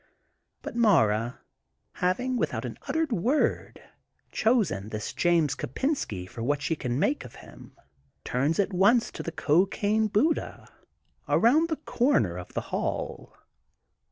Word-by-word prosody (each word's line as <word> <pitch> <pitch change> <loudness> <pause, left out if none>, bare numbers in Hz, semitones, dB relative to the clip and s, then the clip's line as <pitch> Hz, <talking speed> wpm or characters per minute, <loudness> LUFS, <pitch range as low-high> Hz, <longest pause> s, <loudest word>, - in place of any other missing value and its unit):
But - - -6
Mara, 120 - +2 0.5
having, 215 +9 0
without - - -1
an - - -7
uttered 320 -3 0
word, 240 - 0 0.5
chosen 215 - +1
this 105 -1 -5
James 170 -5 +2
Kopensky 120 - -3
for 115 - -9
what 145 +5 0
she 165 - 0
can 125 -4 -3
make 280 - 0
of 120 - -12
him, - - -14 0.5
turns 140 +6 0
at 200 -1 0
once 210 +6 +3
to - - -7
the 165 - -5
cocaine 195 +7 +1
Buddha 235 +11 0 0.6
around 305 +9 +4
the 320 - 0
comer 135 - +1
of 90 - -10
the - - 0
hall. - - -3
185 Hz, 130 wpm, -27 LUFS, -, 0.6 s, around